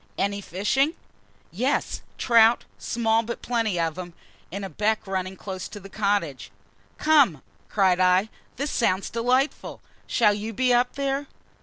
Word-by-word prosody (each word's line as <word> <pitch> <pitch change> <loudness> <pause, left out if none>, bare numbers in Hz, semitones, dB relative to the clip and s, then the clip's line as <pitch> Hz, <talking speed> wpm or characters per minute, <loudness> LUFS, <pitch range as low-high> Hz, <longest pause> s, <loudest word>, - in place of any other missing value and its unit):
"Any 200 +1 -1
fishing?" 265 - 0 0.6
"Yes - - -1 0.2
trout 230 -1 +4
small 225 -1 +1
but 235 +1 -6
plenty 225 -7 0
of 165 +1 -1
'em 175 -1 -7 0.4
in 200 +3 -5
a - - -3
beck 215 +2 0
running 190 -1 -3
close 190 -1 -6
behind 205 -2 -11
the - - -9
cottage." 200 -10 -1 0.5
"Come," 280 - +4 0.3
cried 190 -3 +3
I, 185 +3 +3 0.3
"this 280 +3 -3
sounds 190 -4 0
delightful! 250 +5 0 0.3
Shall 210 - +3
you 215 +2 -5
be 250 +3 +2
up 245 +1 +2
there?" 275 0 -2
210 Hz, 145 wpm, -25 LUFS, 190-240 Hz, 0.6 s, trout